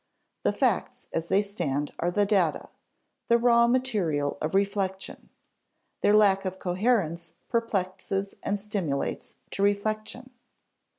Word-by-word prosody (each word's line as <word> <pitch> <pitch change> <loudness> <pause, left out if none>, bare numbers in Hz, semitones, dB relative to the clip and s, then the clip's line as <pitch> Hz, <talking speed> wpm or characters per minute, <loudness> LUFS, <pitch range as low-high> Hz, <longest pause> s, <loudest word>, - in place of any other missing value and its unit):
The - - +2
facts - - -1
as 165 0 -2
they 200 +4 +3
stand 150 -8 -3
are 175 - +1
the 205 +3 +2
data, 190 -6 +1 0.6
the 235 - +5
raw 235 0 +4
material 205 - 0
of 155 +4 -2
reflection; 195 -1 -2 0.7
their 205 - +4
lack 195 -2 +5
of 190 -1 -4
coherence 180 -3 0 0.2
perplexes 195 -3 -2
and 205 0 -1
stimulates 195 -9 -3 0.2
to - - -3
reflection. 215 +5 -1
200 Hz, 120 wpm, -27 LUFS, 180-215 Hz, 0.7 s, the